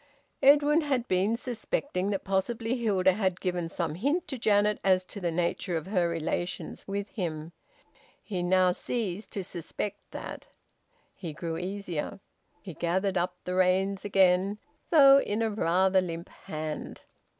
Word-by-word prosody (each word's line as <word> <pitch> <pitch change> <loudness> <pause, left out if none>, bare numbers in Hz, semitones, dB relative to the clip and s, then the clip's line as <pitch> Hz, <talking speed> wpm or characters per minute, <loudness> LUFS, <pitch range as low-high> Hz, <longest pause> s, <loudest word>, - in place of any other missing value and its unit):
Edwin 295 +3 +6
had 265 -5 -1
been 195 +5 +2
suspecting 230 -4 -2
that 200 -2 -2
possibly 225 +5 -1
Hilda 200 -6 +3
had 190 -2 -1
given 175 -3 -2
some 165 -2 -2
hint 285 - 0
to 265 -4 -4
Janet 210 -1 +3
as 185 -1 +4
to 200 - -8
the 175 - 0
nature 170 +1 -1
of 160 - -5
her 185 -3 +1
relations 170 +2 -3
with 200 +1 -3
him. 165 -5 -4 0.7
He 190 -4 -3
now 185 +1 +4
ceased 205 0 -3
to 195 - -3
suspect 185 +4 -5
that. - - -7 0.7
He 165 -5 -7
grew 165 +1 -4
easier. 185 0 -4 0.4
He 185 - -7
gathered 185 +4 0
up 180 0 0
the 180 - -3
reins 190 +1 +2
again, 195 0 +3 0.3
though 275 -4 +8
in 215 -3 -1
a 225 - 0
rather 190 -1 +3
limp 170 -1 -5
hand. 155 -1 -6
190 Hz, 150 wpm, -28 LUFS, 175-210 Hz, 0.7 s, though